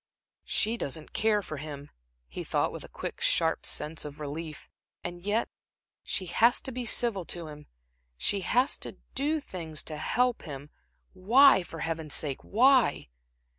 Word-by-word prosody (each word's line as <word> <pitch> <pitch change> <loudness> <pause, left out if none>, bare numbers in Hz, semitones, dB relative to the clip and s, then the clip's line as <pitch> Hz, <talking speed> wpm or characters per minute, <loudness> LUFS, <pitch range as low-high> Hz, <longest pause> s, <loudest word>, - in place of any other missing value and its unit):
"She 225 +2 +1
doesn't 155 - -2
care 210 -1 +2
for 155 - -6
him," 145 0 -8 0.4
he - - -6
thought, - - 0
with - - -7
a - - -10
quick, - - -6
sharp - - +2
sense 155 +1 0
of 150 0 -8
relief. 150 +1 -6 0.4
"And 175 0 -5
yet 205 +5 0 0.5
she 185 - -2
has 235 +8 +4
to 265 - -5
be 250 0 -4
civil 220 -5 +1
to 170 0 -4
him, 150 0 -11 0.5
she 200 - +1
has 250 +8 +2
to - - -6 0.2
do 295 +4 +1
things 165 - -5
to 155 - -6
help 245 +9 +1
him. 145 -1 -8 0.4
Why, 225 +5 +6
for 165 -2 -8
Heaven's 160 -2 -2
sake, 140 -4 -2
why?" 245 - +4
175 Hz, 160 wpm, -29 LUFS, 150-235 Hz, 0.5 s, Why